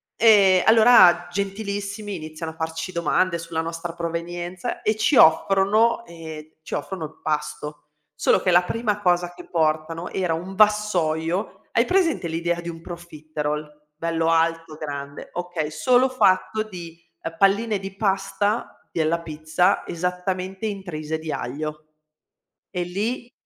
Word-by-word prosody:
Ehm, 200 -5 +6
allora 220 -6 +7
gentilissimi 200 +1 -3
iniziano 155 0 -6
a - - -21
farci 160 +2 -4
domande 170 +1 +1
sulla 165 -1 -3
nostra 165 +1 -5
provenienza 175 +1 -4
e 215 0 +1
ci 275 - +2
offrono 200 +8 +4
ehm, 160 -3 -8 0.2
ci - - -8
offrono 190 -5 -4
il 155 - -12
pasto. 150 0 -3 0.4
Solo - - +3
che 185 - +1
la 175 0 +6
prima 210 +1 -1
cosa 175 -2 +1
che - - -12
portano 160 +1 0
era 180 -3 -1
un 180 +4 -6
vassoio 190 -4 +1
hai 230 - +3
presente 350 - +1
l'idea 170 +1 -1
di 170 - -6
un 165 -1 -8
profiterol? 155 -3 -5 0.2
Bello 165 -1 0
alto, 165 -1 +1
grande. 140 -2 -6
Okay, 175 -3 -3
solo 245 +12 +3
fatto 215 -3 +2
di, 170 -5 -10 0.2
ehm, 165 0 -5
palline 205 +3 +3
di 195 0 -8
pasta 200 +2 -1
della 165 0 +1
pizza 160 +4 0
esattamente 185 +3 -3
intrise 165 -6 -4
di 155 -1 -5
aglio. 150 +4 -5 0.9
E 180 - -2
lì 215 +7 -3
175 Hz, 135 wpm, -23 LUFS, 160-200 Hz, 0.9 s, allora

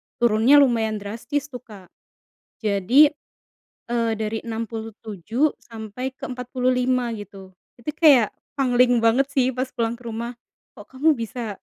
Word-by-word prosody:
turunnya 235 +3 +4
lumayan 225 -4 +1
drastis 235 +8 -4
tuh 250 - -6
kak. 205 -7 -15 0.7
Jadi, 220 +8 +5 0.8
eee, 230 -1 +1
dari 220 +1 -2
67 225 - -3
sampai 230 +3 -7
ke - - -9
45 250 0 0
gitu. 195 -2 -11 0.3
Itu 270 - -3
kayak 280 - +5 0.2
pangling 245 -3 +3
banget 235 +4 +3
sih 260 -2 +3
pas 255 +1 -2
pulang 235 -1 -1
ke 245 - -13
rumah. 235 +1 -5 0.4
"Kok 205 - -11
kamu 295 +5 +2
bisa 230 -2 -5
235 Hz, 130 wpm, -23 LUFS, 220-255 Hz, 0.8 s, Jadi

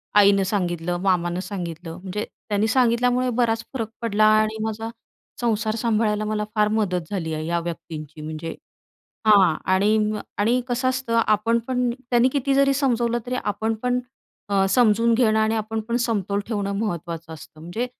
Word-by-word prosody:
आईनं 200 -1 +6
सांगितलं, 175 -3 -1
मामानं 180 -2 +1
सांगितलं 175 -4 -6
म्हणजे 195 +3 -4 0.2
त्यांनी 205 +1 +1
सांगितल्यामुळे 250 +1 +2
बराच 225 -1 +1
फरक 225 -4 -3
पडला 215 -2 +2 0.2
आणि 215 0 -2
माझा 220 +1 -3 0.5
संसार 220 -1 0
सांभाळायला 215 -2 +1
मला 210 0 -1
फार 210 0 +3
मदत 185 -6 -1
झाली 165 -5 -2
आहे 155 0 -3
या 170 +1 0
व्यक्तींची. 155 -2 -7
म्हणजे 155 +1 -5 0.7
हां. 190 -6 +6 0.2
आणि 205 +3 +3 0.2
अ, - - -5 0.2
आणि 235 +5 +2
कसं 255 +2 0
असतं 255 -3 +1
आपण 215 +2 +2
पण 250 -1 +1 0.2
त्यांनी 240 +1 +4
किती 275 -1 +1
जरी 275 0 +4
समजवलं 240 -4 +1
तरी 250 - -2
आपण 220 +2 -1
पण 250 0 +1 0.5
अ, 195 -1 +2
समजून 230 +1 +4
घेणं 220 -2 +3
आणि 220 +1 +2
आपण 220 +1 -2
पण 235 - +1
समतोल 205 -4 0
ठेवणं 205 -3 -2
महत्त्वाचं 170 -5 -4
असतं. 155 0 -12
म्हणजे 175 +10 -3
215 Hz, 160 wpm, -23 LUFS, 185-235 Hz, 0.7 s, आईनं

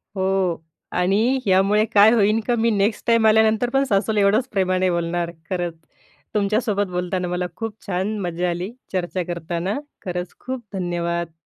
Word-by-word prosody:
हो. 190 -3 0 0.3
आणि 215 +9 +2
ह्यामुळे 195 +3 +4
काय 210 +2 +7
होईन 215 -1 +3
का, 240 - +2
मी 230 0 +2
नेक्स्ट 205 +1 0
टाईम 230 -1 +4
आल्यानंतर 220 +2 +4
पण 270 - +4
सासूला 210 +1 +1
एवढंच 215 +6 +3
प्रेमाने 185 -2 +1
बोलणार. 170 0 -1 0.2
खरंच. 175 -2 -2 0.6
तुमच्यासोबत 205 0 +1
बोलताना 180 0 -2
मला 180 0 -2
खूप 225 0 -4
छान 195 +3 -1
मज्जा 175 0 -1
आली. 175 +5 -3 0.2
चर्चा 185 -1 -2
करताना, 175 - -3 0.3
खरंच 180 -1 -4
खूप 255 -1 -5
धन्यवाद! 170 -2 -2
195 Hz, 145 wpm, -22 LUFS, 180-215 Hz, 0.6 s, काय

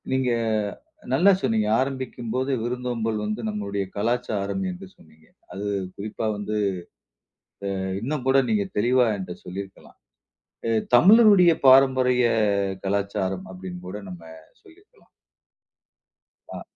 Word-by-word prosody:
நீங்க 130 -1 +1 0.8
நல்லா 195 +3 +5
சொன்னீங்க. 110 -1 +1
ஆரம்பிக்கும்போது 130 -1 -3
விருந்தோம்பல் 120 -2 -2
வந்து 105 +3 -3
நம்முடைய 100 -1 -3
கலாச்சாரம் 115 - -1
என்று 185 +2 -9
சொன்னீங்க. 80 0 -22 0.3
அது 100 +1 -5 0.3
குறிப்பா 105 +2 -5
வந்து 105 +1 -4 1.2
அ - - -3 0.2
இன்னும் 135 +3 -3
கூட 135 +1 +4
நீங்க 105 -2 +1
தெளிவா 125 +3 +3
என்ட 95 -2 -6
சொல்லியிருக்கலாம். 95 +2 -9 0.7
அ - - +1 0.3
"தமிழருடைய 200 - +7
பாரம்பரிய 130 -2 +5 0.6
கலாச்சாரம்" 95 -1 -2
அப்டின்னு 90 -1 -9
கூட 105 +3 -6
நம்ம 90 -2 -10 0.4
சொல்லிருக்கலாம். 405 +6 -23 1.5
ஆ. - - -7
115 Hz, 105 wpm, -24 LUFS, 100-130 Hz, 1.5 s, தமிழருடைய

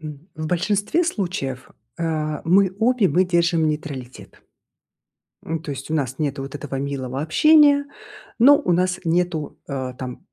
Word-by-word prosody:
м, 155 +2 -10
в 155 0 -5
большинстве 205 - 0
случаев, 175 - -3 0.3
а, 155 -2 -2
мы 190 +2 +4
обе, 230 -4 +3
мы 185 +2 +3
держим 170 -2 +2
нейтралитет. 140 -5 -7 1.0
М, 165 - -2
ну - - -6
то 155 - -7
есть 135 +2 -8
у - - 0
нас 135 -4 -2
нету 140 -3 -2
вот 135 +1 -8
этого 140 -2 -5
милого 135 -1 -4
общения, 290 - +5 0.5
но 280 +5 +7
у 280 - 0
нас 180 +1 +1
нету, 170 -2 -1
э, 130 -2 -4
там 125 -1 -7
160 Hz, 155 wpm, -22 LUFS, 140-185 Hz, 1.0 s, но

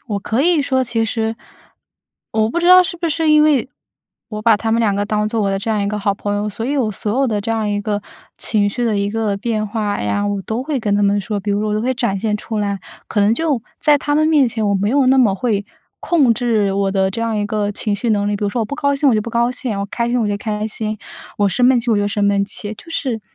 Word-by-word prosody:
我 205 -3 -2
可 220 +5 -1
以 335 -3 +3
说 260 -2 +1
其 230 -2 0
实 225 0 -2 1.0
我 220 0 +1
不 345 - -1
知 345 - +1
道 365 +1 +8
是 345 - -4
不 340 0 -2
是 320 +1 0
因 305 0 +6
为 285 -4 +3 0.6
我 215 -2 -5
把 225 -2 +5
他 225 +2 -2
们 225 - +2
2 215 -4 +2
个 200 +1 0
当 210 0 0
做 225 +1 -1
我 195 - +1
的 195 - -1
这 205 - -5
样 210 -2 0
一 200 - -1
个 210 0 -2
好 200 -1 0
朋 205 0 -3
友， 210 +1 -1
所 210 +2 -4
以 280 +4 -1
我 225 -6 0
所 205 - -3
有 275 - +3
的 215 -4 -1
这 220 +3 -4
样 220 -2 0
一 205 0 -1
个 205 -1 -2 0.4
情 205 -2 +1
绪 245 +4 -2
的 220 -3 +1
一 200 0 0
个 215 -2 -1
变 215 0 -2
化 210 -1 -2
呀， 105 - -1
我 205 -1 -1
都 225 +5 -3
会 290 -1 -2
跟 210 -4 0
他 205 - +2
们 200 0 +2
说， 205 0 -3
比 205 +1 -3
如 200 0 +1
说 215 0 -1
我 210 - 0
都 215 - 0
会 255 +3 0
展 235 -6 -1
现 210 0 -1
出 220 +1 -5
来。 200 -1 -1 0.3
可 210 - 0
能 205 +2 +4
就 295 -2 0 0.2
在 295 -1 +4
他 290 +1 -1
们 310 +1 +3
面 295 -5 +4
前， 220 -2 -2
我 200 - +2
没 200 +2 0
有 275 0 +3
那 265 +1 +4
么 220 -6 +4
会 205 -1 -1 0.3
控 290 -9 +3
制 215 -4 +1
我 195 0 0
的 190 -1 +1
这 210 - -5
样 230 -1 -1
一 205 - 0
个 205 -1 -1
情 205 0 -2
绪 230 +3 -1
能 205 -1 +1
力。 205 - 0
比 210 - -3
如 - - +1
说 235 +4 -2
我 - - +1
不 285 - -5
高 280 -2 +1
兴， 280 +1 +2
我 250 - +4
就 215 - +2
不 215 - -5
高 235 +1 +1
兴； 245 -3 -4
我 200 - -2
开 235 +3 -2
心， 245 0 +1
我 215 - 0
就 205 - -1
开 210 0 -3
心； 215 0 -4 0.4
我 205 -1 +3
生 245 +6 +2
闷 255 -2 +4
气， 235 - -2
我 220 - +3
就 205 0 +1
生 205 0 0
闷 200 0 +2
气。 205 +1 -7
就 330 - -14
是， 255 -8 -2
220 Hz, 315 characters per minute, -18 LUFS, 205-245 Hz, 1.0 s, 道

